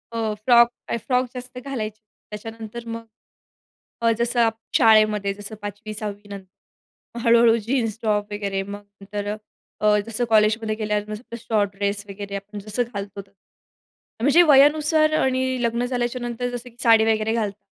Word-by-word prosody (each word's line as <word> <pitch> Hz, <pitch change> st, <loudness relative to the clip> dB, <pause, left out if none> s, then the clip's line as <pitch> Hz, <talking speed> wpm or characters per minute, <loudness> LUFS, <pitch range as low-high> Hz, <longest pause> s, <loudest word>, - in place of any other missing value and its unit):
हो, 220 Hz, -2 st, -1 dB
फ्रॉक, 235 Hz, -1 st, +7 dB, 0.2 s
तर -, -, 0 dB
फ्रॉक 250 Hz, +2 st, 0 dB
जास्त 250 Hz, 0 st, -8 dB
घालायचे. 220 Hz, -6 st, -4 dB, 0.3 s
त्याच्यानंतर 225 Hz, +2 st, -8 dB
मग 230 Hz, 0 st, -6 dB, 1.0 s
अ, 230 Hz, 0 st, +4 dB
जसं 240 Hz, +1 st, +1 dB
अप 225 Hz, 0 st, 0 dB, 0.2 s
शाळेमध्ये 215 Hz, -3 st, +4 dB
जसं 205 Hz, +2 st, -9 dB
5वी-6वी 205 Hz, 0 st, -6 dB
नंतर, 200 Hz, -1 st, -8 dB, 0.7 s
मग 235 Hz, -, -4 dB
हळू-हळू 230 Hz, 0 st, +6 dB
जीन्स, 230 Hz, -3 st, 0 dB
टॉप 210 Hz, -2 st, 0 dB
वगैरे. 200 Hz, -2 st, -2 dB
मग 200 Hz, +1 st, -8 dB, 0.2 s
नंतर 205 Hz, +1 st, -5 dB
अ, 210 Hz, -, -1 dB, 0.5 s
अ, 210 Hz, 0 st, +4 dB
जसं 230 Hz, +2 st, -1 dB
कॉलेजमध्ये 215 Hz, 0 st, +3 dB
गेल्यावर 210 Hz, -1 st, -2 dB
नुसतं 215 Hz, +3 st, -7 dB
शॉर्ट 210 Hz, -3 st, 0 dB
ड्रेस 200 Hz, 0 st, -2 dB
वगैरे 200 Hz, 0 st, -6 dB
आपण 205 Hz, +1 st, -7 dB
जसं 210 Hz, +4 st, -2 dB
घालतो 200 Hz, -1 st, -5 dB
ते. 195 Hz, 0 st, -23 dB, 0.9 s
म्हणजे 285 Hz, +7 st, +6 dB
वयानुसार 305 Hz, +2 st, +5 dB
आणि 260 Hz, 0 st, +1 dB, 0.2 s
लग्न 235 Hz, +1 st, 0 dB
झाल्याच्यानंतर 245 Hz, -1 st, -2 dB
जसं 245 Hz, +1 st, -7 dB
की 235 Hz, -, -24 dB
साडी 225 Hz, -2 st, +6 dB
वगैरे 215 Hz, +1 st, -1 dB
घालतात. 210 Hz, -3 st, -2 dB
220 Hz, 150 wpm, -23 LUFS, 205-235 Hz, 1.0 s, फ्रॉक